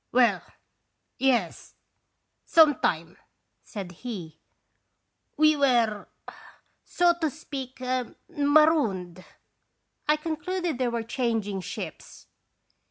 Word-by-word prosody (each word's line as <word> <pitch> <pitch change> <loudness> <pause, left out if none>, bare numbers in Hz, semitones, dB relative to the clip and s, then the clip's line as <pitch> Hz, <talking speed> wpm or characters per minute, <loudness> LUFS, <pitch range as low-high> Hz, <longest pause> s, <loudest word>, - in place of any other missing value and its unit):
"Well 245 -1 +4 0.8
yes 240 -9 0 0.7
some 310 -4 +5
time," 165 +1 -1 0.5
said 195 -4 -7
he; 180 -5 -8 0.5
" - - -50
we 310 0 +5
are 230 -6 +2 0.7
so 350 -1 +3
to 320 - +2
speak 270 -4 -8 0.5
marooned." 285 - +2 0.8
I 300 - +5
concluded 330 0 -3
they 255 - +1
were 235 -1 -2
changing 225 -5 -2
ships. - - -8
250 Hz, 90 wpm, -26 LUFS, 205-305 Hz, 0.8 s, some